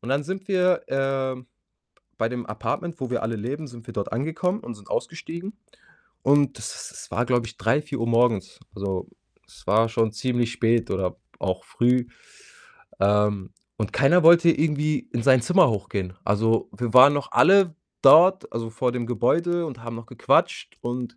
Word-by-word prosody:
Und 115 - -9
dann 140 +2 +1
sind 190 +5 -6
wir 185 -2 +2
äh, 135 -1 -2 0.8
bei 115 - 0
dem 120 -1 -5
Apartment, 150 - -4
wo 130 - -3
wir 125 - -2
alle 115 +1 -2
leben, 135 +8 -5
sind 120 -3 -14
wir - - -8
dort 100 - -4
angekommen 160 - -2
und 120 - -8
sind 105 -1 -18
ausgestiegen. 170 +4 -5 0.7
Und 140 -1 +2
das 110 -1 -7
es - - -12
war, 120 - 0
glaube 120 -2 0
ich, 115 - -11
3, 135 +6 +1
4 145 -4 -6
Uhr 115 - -1
morgens, 115 -4 +1 0.2
also 95 -2 -4 0.4
es - - -19
war 110 +2 +3
schon 115 -1 0
ziemlich 120 +1 -1
spät 115 -1 0
oder 95 -2 -2 0.2
auch 95 -1 -3
früh, 125 +1 +1 0.9
ähm, 105 -1 +1 0.2
und 105 -3 -4
keiner 160 +7 +4
wollte 170 0 +7
irgendwie 150 -2 -1
in 120 - -2
sein 130 0 +4
Zimmer 180 +1 +4
hochgehen. 95 -3 -4
Also, 110 +3 +1
wir 120 -2 -3
waren 130 +3 +9
noch 145 - -4
alle 190 -4 +5 0.3
dort, 175 +7 +6
also, 115 0 -4
vor 125 +2 -1
dem 120 -1 -3
Gebäude 170 +9 0
und 125 -6 -9
haben 115 0 -6
noch 115 0 -10
gequatscht - - 0
und 120 0 -5
125 Hz, 175 wpm, -24 LUFS, 115-150 Hz, 0.9 s, waren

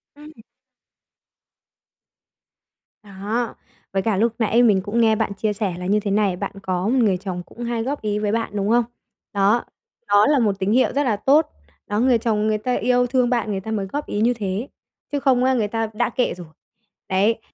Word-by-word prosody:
Ừm. 300 +1 -13 2.7
Đó, 210 +4 -3 0.4
với 195 - +1
cả 215 -2 0
lúc 225 +2 +2
nãy 230 +2 +3
mình 205 -5 +4
cũng 210 +4 -1
nghe 220 -1 +4
bạn 205 - -1
chia 210 +1 -1
sẻ 205 -3 -2
là 180 - -6
như 205 +3 +2
thế 205 -1 -3
này, 200 -2 +2
bạn 200 +2 -4
có 185 0 -1
một 255 +4 +2
người 195 -4 +2
chồng 180 -1 -5
cũng 240 - -10
hay 235 -1 -2
góp 280 +4 -3
ý 210 -1 -1
với 210 -1 -1
bạn, 230 +1 -1
đúng 200 -1 -1
hông? 240 +1 +4 0.5
Đó, 205 +4 +2 0.4
đó 205 +1 +5
là 290 -2 +3
một 205 -4 +1
tín 195 +1 0
hiệu 255 +3 +3
rất 285 - +1
là 235 -6 +1
tốt. 285 +9 +3 0.4
Đó, 205 - -1
người 250 0 +4
chồng 215 -2 0
người 215 0 +1
ta 250 +4 -2
yêu 245 +2 +2
thương 250 -1 +1
bạn 235 -3 0
người 195 - -2
ta 220 +3 -7
mới 205 -3 -1
góp 290 +10 -4
ý 205 - -2
như 240 +2 +3
thế, 210 +1 -3 0.4
chứ 290 - -1
không 260 -3 +2
á 260 +1 +3
người 225 -5 +1
ta 225 +1 -2
đã 240 +3 0
kệ 245 +1 0
rồi. 175 -2 -10 0.6
Đấy, 205 +5 +2
220 Hz, 210 wpm, -22 LUFS, 200-245 Hz, 2.7 s, đó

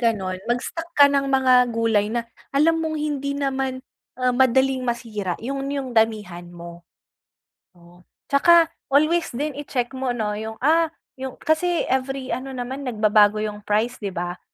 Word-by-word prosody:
gano'n, 195 -6 -1
mag-stock 325 +7 -2
ka 285 - +9
ng 280 -1 +2
mga 255 -2 +4
gulay 225 -3 +1
na 235 +1 -2 0.2
alam 325 +4 +2
mong 320 -1 -2
hindi 280 -2 -2
naman, 265 -2 -2 0.3
ah, 255 0 +1
madaling 260 +1 +3
masira 230 -7 -3
'yun 275 +3 -4
'yung 275 -3 -3
damihan 210 -6 0
mo. 170 0 -11 1.0
Oh, 175 0 -19 0.3
tsaka 335 +3 +5 0.2
always 310 +5 +2
din 295 +4 -2
i-check 250 -4 -3
mo 260 -2 -2
'no 215 -3 -2
'yung, 220 +1 -5
ah 325 +3 +4 0.3
'yung 265 -1 -5
kasi 335 +2 0
every 265 0 -2
ano 265 +1 -4
naman 255 +2 -5
nagbabago 215 -2 +3
'yung 210 -1 -4
price, 220 +4 0
di 205 - -4
ba? 175 -1 -4
255 Hz, 155 wpm, -23 LUFS, 215-280 Hz, 1.0 s, ka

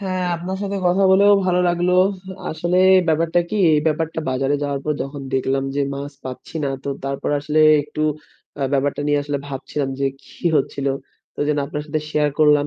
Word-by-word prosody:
হ্যাঁ, 185 -2 -2
আপনার 185 +3 -4
সাথে 200 0 -2
কথা 180 +2 +3
বলেও 200 +2 +6
ভালো 180 -1 +2
লাগলো। 175 +1 +1 0.6
আসলে 175 +3 -1 0.3
ব্যাপারটা 165 +2 +2
কি, 215 - -1 0.2
এই 150 - +3
ব্যাপারটা 160 +1 0
বাজারে 135 +2 0
যাওয়ার 140 -1 -2
পর 150 - +1
যখন 140 +1 -7
দেখলাম 135 +1 0
যে - - +1
মাছ 140 +1 -6
পাচ্ছি 130 +4 -8
না, - - 0
তো - - -5 0.2
তারপর 135 +1 -2
আসলে 150 +1 -1 0.2
একটু 150 +1 -7 0.6
আ - - 0
ব্যাপারটা 140 +1 0
নিয়ে 145 0 +2
আসলে 145 0 -2
ভাবছিলাম 140 0 -4
যে - - +1 0.2
কি - - -18 0.2
হচ্ছিল। 140 0 -1 0.5
তো - - -34
যেন 150 - +1
আপনার 150 +1 -4
সাথে 155 0 -2
share 150 -1 +1
করলাম 150 -1 +4
150 Hz, 185 wpm, -21 LUFS, 140-175 Hz, 0.6 s, বলেও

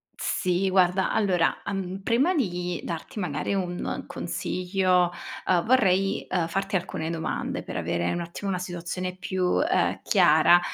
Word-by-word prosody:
Sì 185 +1 0
guarda 185 0 +3
allora, 190 -6 +2
uhm, 195 -1 -3
prima 265 - +3
di 180 - -1
darti 170 +5 -5
magari 160 +1 -2
un 180 -2 -2
consiglio, 180 +1 0 0.3
uhm, 175 -2 +3
vorrei, 195 -6 +3
uhm, 175 -3 0
farti 195 +3 -2
alcune 165 -2 -2
domande 160 -1 -3
per - - -6
avere 85 0 -1
un 175 - -2
attimo 170 +4 -5
una 180 -2 -1
situazione 180 +1 -4
più, 185 +2 0
ehm, 340 +5 +1
chiara. 175 -2 +6
180 Hz, 140 wpm, -26 LUFS, 175-195 Hz, 0.3 s, chiara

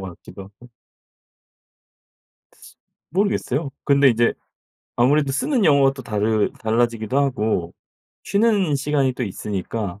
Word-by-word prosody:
같기도 95 +3 -12
하고 105 +5 -17 2.4
모르겠어요. 165 -7 -1
근데 140 -1 +4
인제 120 0 +2 0.6
아무래도 135 +3 +2
쓰는 245 - 0
용어가 140 -2 +4
또 135 -1 -10
다르 105 -1 0
달라지기도 115 +1 0
하고 110 -10 -1 0.5
쉬는 200 -7 +2
시간이 140 -1 0
또 125 - -4
있으니까. 100 0 -5
130 Hz, 260 characters per minute, -21 LUFS, 110-145 Hz, 2.4 s, 근데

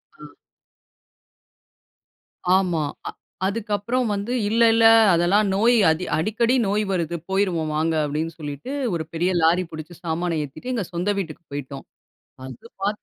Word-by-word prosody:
ஆ. - - -27 2.4
ஆமா. 175 -5 0 0.3
அ - - -6 0.4
அதுக்கப்புறம் 220 +4 -1
வந்து, 200 +4 -3 0.2
இல்லை 230 +1 +4
இல்லை, 225 0 +6 0.2
அதெல்லாம் 195 +5 +3
நோய் 235 +4 +4 0.4
"அடிக்கடி 230 +8 +1
நோய் 210 +2 +1
வருது, 170 -2 -1
போய்ருவோம் 175 -6 0
வாங்க" 160 +1 +1
அப்டின்னு 150 +2 -1
என்று 165 0 -9
சொல்லிட்டு 145 - -6 0.2
ஒரு 160 -2 -2
பெரிய 175 +3 0
லாரி 175 +3 +3
பிடிச்சு 155 +2 -8
சாமானை 165 0 -1
ஏத்திட்டு 245 - -8
எங்க 215 -7 -2
சொந்த 180 +4 -1
வீட்டுக்கு 165 -2 -6
போய்ட்டோம். 140 -1 -6 0.6
அது 130 - -11
பாத் 205 +1 -2
180 Hz, 135 wpm, -23 LUFS, 160-210 Hz, 2.4 s, இல்லை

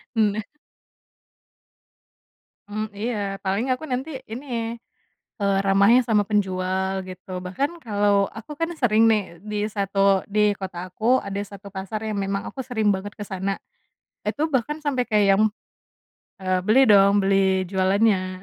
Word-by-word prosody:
Nah. 215 -1 +2 2.3
Mmm, 215 +1 -3
iya, 205 -2 -2
paling 200 +6 0
aku 255 - -13
nanti 255 +4 -2 0.2
ini, 255 +6 -7 0.9
eee, 200 -1 +2
ramahnya 200 +5 +5
sama 220 -3 +3
penjual 190 -2 0
gitu. 185 0 -11
Bahkan 275 - -3
kalau 205 -4 +2
aku 225 +6 -10
kan 330 - +1
sering 225 -4 +4
nih 200 -6 0
di 210 +1 -3
satu 195 -1 +2
di 210 0 +3
kota 190 -2 -6 0.2
aku 230 +6 +3
ada 200 0 -3
1 200 0 -9
pasar 200 +3 -5
yang 215 -2 -2
memang 195 0 -2
aku 270 - -7
sering 220 -5 +1
banget 200 +2 -5
ke 210 - -6
sana. 195 0 -3 0.7
Itu 290 +10 -1
bahkan 300 +2 -1
sampai 280 -4 0
kayak 210 -3 +2
yang 210 - +3 1.0
eee, 185 0 +1
"Beli 225 +5 +5
dong, 200 0 +6
beli 195 -1 +3
jualannya." 190 -1 +1
205 Hz, 140 wpm, -23 LUFS, 195-225 Hz, 2.3 s, dong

